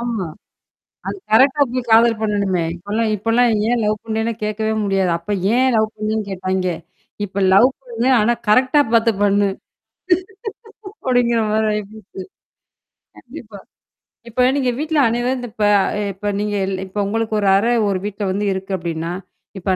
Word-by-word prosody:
ஆமா. 235 -6 -3 0.8
அது - - -3 0.2
கரெக்ட்டா 270 +6 +5
போய் 250 -1 -4
காதல் 225 0 +5
பண்ணணுமே. 200 -4 0
இப்ப 175 +3 -14
எல்லாம் 225 0 +1
இப்ப 210 +3 -5
எல்லாம் 245 +1 +4 0.2
ஏன் 240 0 +1
லவ் 210 0 +1
பண்ணனே 220 +1 -1
கேக்கவே 215 +1 -1
முடியாது. 195 -3 +1
அப்ப 170 +5 -5 0.2
ஏன் 260 +1 +3
லவ் 220 0 +2
பண்ணனு 215 +1 -2
கேட்டாங்க. 185 0 -2 0.6
இப்ப 200 0 -4
லவ் 200 +7 +7 0.2
பண்ணு. 240 0 -2
ஆனா, 220 +3 +3 0.2
கரெக்ட்டா 255 +6 +4
பாத்து 230 0 +4
பண்ணு. 205 0 +3 1.6
அப்படிங்கற 245 -2 +2
மாரி 220 0 +1
ஆயி 210 0 -1
போச்சு. 215 -3 -16 1.0
கண்டிப்பா. 235 -6 -11 0.7
இப்ப 250 +2 +2
நீங்க 260 -3 +1
வீட்டுல 310 0 0
அனைவரும் 240 +3 0
இந்த 245 -1 -6
இப்ப 215 -2 0 0.5
இப்ப 200 +2 -6
நீங்க 210 0 -2
இல் 190 -1 -3
இப்ப 190 +2 -11
உங்களுக்கு 225 +1 -2
ஒரு 200 - 0
அறை 230 +5 +2 0.2
ஒரு 190 -2 -1
வீட்டுல 205 0 -2
இருக்கு 190 +1 -6
அப்படின்னா, 165 -1 -4 0.5
இப்ப 185 +1 0
215 Hz, 150 wpm, -19 LUFS, 200-235 Hz, 1.6 s, லவ்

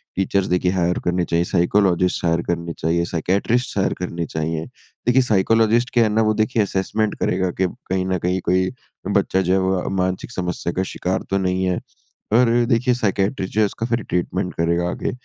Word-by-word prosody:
Teachers 95 0 +1
देखिए 90 0 +1
higher 90 -1 +1
करने 90 0 +1
चाहिए, 85 0 +1
साइकोलॉजिस्ट 90 0 +2
हायर 85 0 +2
करने 85 -1 -2
चाहिए, 85 +2 0
साइकियाट्रिस्ट 100 +8 0
हायर 95 - +1
करने 85 -2 -3
चाहिए। 80 +1 -3 0.4
देखिए 130 +2 +5
साइकोलॉजिस्ट 115 +2 +2
क्या 120 -2 +5
है 110 - +2
ना 110 - +3
वो 110 0 +2
देखिए 110 +1 +1
असेसमेंट 105 +2 -1
करेगा 95 0 0
कि 95 - +4 0.2
कहीं 95 0 0
ना 95 -1 0
कहीं 90 +1 +1
कोई 95 +1 +2 0.4
बच्चा 95 - +1
जो 90 0 +1
है 95 - +3
वो 95 0 +1
अ, - - -5
मानसिक 95 +3 -2
समस्या 90 -2 -3
का 95 - 0
शिकार 95 +1 -1
तो 95 - +1
नहीं 95 0 0
है। 90 -1 0 0.6
और 120 +1 +5
अ, 120 0 +3
देखिए 125 +2 +2
साइकियाट्रिस्ट 100 -3 -1
जो 110 - +2
है - - +5
उसका 115 +3 -4
फिर 115 -1 -1
ट्रीटमेंट 90 +1 -2
करेगा 85 +1 +1
आगे। - - -3
95 Hz, 195 wpm, -21 LUFS, 90-110 Hz, 0.6 s, देखिए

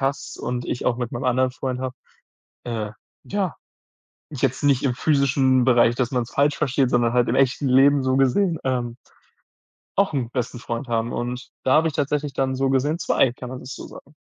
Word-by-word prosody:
hast 135 +1 -2
und 120 0 -3
ich 120 - -3
auch 120 - +2
mit 120 -1 -4
meinem 120 +2 -4
anderen 130 0 +2
Freund 130 0 -4
habe, 130 -1 -4 0.7
äh, 110 -3 -3 0.3
ja, 195 -4 -2 0.8
jetzt 135 -1 -1
nicht 140 -3 +3
im 125 -3 +1
physischen 135 -3 +3
Bereich, 120 -2 +4
dass 125 -2 0
man's 125 -2 -2
falsch 145 +1 +2
versteht, 135 -3 +1
sondern 120 -1 +2
halt 125 -1 +3
im 125 - +1
echten 135 +1 +2
Leben 135 +2 +5
so 130 0 +1
gesehen, 165 +6 +2
ähm 120 -3 -1 1.0
auch 200 -4 +2
'n 125 -5 -1
besten 125 -1 -3
Freund 120 +2 -5
haben 115 0 -1
und 125 +2 -4
da 130 - +3
habe 160 +1 +4
ich 155 - -3
tatsächlich 145 0 -1
dann 130 +1 0
so 135 +1 +1
gesehen 135 +4 +1
zwei, 130 - +2
kann 125 0 -9
man 130 0 -6
das 130 +1 -8
so - - -8
sagen. 145 - -14
130 Hz, 195 wpm, -23 LUFS, 125-140 Hz, 1.0 s, Leben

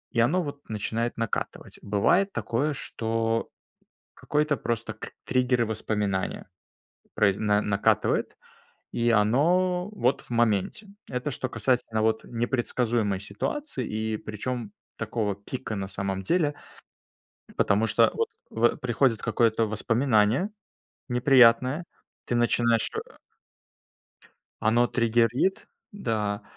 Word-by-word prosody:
И - - +2
оно 160 +10 +3
вот 145 -3 -7
начинает 110 +3 -2
накатывать. 115 -3 -4
Бывает 105 - +3
такое, 140 +6 -1
что 115 -2 -2 0.6
какой-то 150 -1 0
просто 115 -1 -3
кр 110 - -9
триггеры 125 -1 +2
воспоминания 105 -3 -2 0.7
произ 100 -3 +3
на 105 -1 +2
накатывает, 105 0 +2 0.7
и 120 0 +2
оно 175 - +3
вот 135 - 0
в - - -20
моменте. 115 - +1 0.3
Это 125 +4 -2
что 130 0 -3
касательно 120 -4 0
вот 110 0 +1
непредсказуемой 120 -4 -1
ситуации, 130 - -4 0.3
и - - 0
причем 110 +1 -5 0.3
такого 105 -4 -2
пика, 110 +1 -6
на 95 -1 -3
самом 95 0 -3
деле. 155 - +2 1.0
Потому 105 +3 +2
что - - +4
вот - - 0 0.2
в 120 +1 +2
приходит 120 -2 +1
какое-то 115 0 +2
воспоминание 115 - +2 0.6
неприятное, 125 +3 +5 0.4
ты 120 - 0
начинаешь 115 -1 +2
э - - -6 1.5
Оно 120 +3 +3
триггерит, 120 - +1 0.2
да, 110 - -2
115 Hz, 110 wpm, -26 LUFS, 110-130 Hz, 1.5 s, неприятное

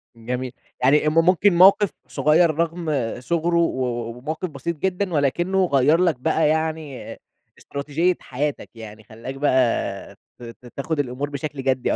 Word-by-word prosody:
جميل، 125 +2 -4 0.3
يعني 150 +3 +4
م - - -3
ممكن 185 +1 +4
موقِف 195 +2 +6 0.2
صغيّر 155 +3 +3
رغم 165 -1 -2 0.3
صُغره 170 +6 -1
و 130 -6 +1
و 120 -1 -4
وموقف 155 +7 -4
بسيط 155 +3 -5
جدًا، 185 +1 -2
ولكنه 175 +7 +1
غيّر 145 0 +3
لك 175 -4 +2
بقى 160 +2 +1
يعني 155 -3 -3 0.4
استراتيجية 150 +5 -1
حياتك، 140 +3 -4
يعني 110 -1 -11
خلّاك 115 +5 -9
بقى 130 -4 0 0.2
ت - - -12
ت 115 +1 -11
تاخد 150 +2 -3
الأمور 135 +1 -2
بشكل 145 -1 -5
جدّي 130 -1 +1
150 Hz, 145 wpm, -22 LUFS, 130-170 Hz, 0.4 s, موقِف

